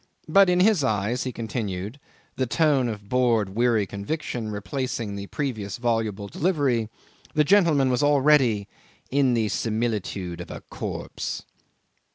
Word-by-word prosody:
But 195 Hz, +4 st, +6 dB
in 180 Hz, 0 st, +3 dB
his 200 Hz, -6 st, +4 dB
eyes, 110 Hz, +2 st, 0 dB
he 130 Hz, -, -2 dB
continued 110 Hz, -1 st, -4 dB, 0.4 s
a 130 Hz, -, -1 dB
tone 140 Hz, -3 st, +2 dB
of 105 Hz, -2 st, -7 dB
bored, 120 Hz, -4 st, +2 dB
weary 115 Hz, 0 st, +2 dB
conviction 110 Hz, -, -4 dB
replacing 105 Hz, +1 st, -3 dB
his 100 Hz, 0 st, -6 dB
previous 110 Hz, -9 st, -3 dB
voluble 115 Hz, -4 st, -1 dB
delivery 140 Hz, -, 0 dB, 0.5 s
the 155 Hz, -, +5 dB
gentleman 155 Hz, -7 st, +4 dB
was 125 Hz, -, +1 dB
already 140 Hz, -7 st, +4 dB, 0.4 s
"in 135 Hz, -2 st, +3 dB
the 110 Hz, -2 st, +1 dB
similitude 105 Hz, -6 st, -2 dB
of -, -, -9 dB
a -, -, -7 dB
corpse." -, -, -5 dB
120 Hz, 135 wpm, -25 LUFS, 105-140 Hz, 0.5 s, But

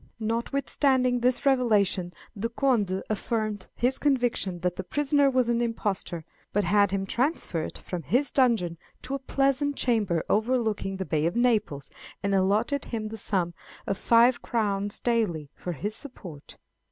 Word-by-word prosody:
Notwithstanding 250 Hz, +2 st, +1 dB
this 250 Hz, +3 st, +1 dB
revelation, 210 Hz, -9 st, +2 dB, 0.2 s
the 220 Hz, +3 st, -2 dB
Conde 230 Hz, -7 st, +1 dB
affirmed 215 Hz, -1 st, -2 dB
his 250 Hz, +2 st, +1 dB
conviction 245 Hz, -9 st, +1 dB
that 180 Hz, 0 st, 0 dB
"the 190 Hz, -, -4 dB
prisoner 285 Hz, +5 st, +2 dB
was 255 Hz, -2 st, +2 dB
an 235 Hz, 0 st, +1 dB
impostor;" 200 Hz, -8 st, -2 dB, 0.3 s
but 205 Hz, -, +1 dB
had 200 Hz, +2 st, +3 dB
him 195 Hz, 0 st, -1 dB
transferred 235 Hz, -, -1 dB
from 180 Hz, -2 st, -6 dB
his 245 Hz, -, +1 dB
dungeon 220 Hz, -, +2 dB, 0.2 s
to 260 Hz, -, -5 dB
a 275 Hz, -, -1 dB
pleasant 275 Hz, +2 st, +1 dB
chamber 205 Hz, -11 st, +1 dB
overlooking 220 Hz, -3 st, 0 dB
the 190 Hz, -, -3 dB
Bay 155 Hz, -1 st, +1 dB
of 170 Hz, -, -2 dB
Naples, 220 Hz, -, +1 dB, 0.3 s
and 200 Hz, 0 st, 0 dB
allotted 210 Hz, +8 st, +1 dB
him 220 Hz, -2 st, -4 dB
the 225 Hz, -, -6 dB
sum 185 Hz, -5 st, -1 dB, 0.3 s
of 195 Hz, -, -1 dB
five 235 Hz, +4 st, +4 dB
crowns 205 Hz, -3 st, -1 dB
daily 190 Hz, -, 0 dB
for 175 Hz, -, -5 dB
his 205 Hz, +8 st, -3 dB
support. 185 Hz, -, -8 dB
220 Hz, 150 wpm, -27 LUFS, 190-250 Hz, 0.3 s, five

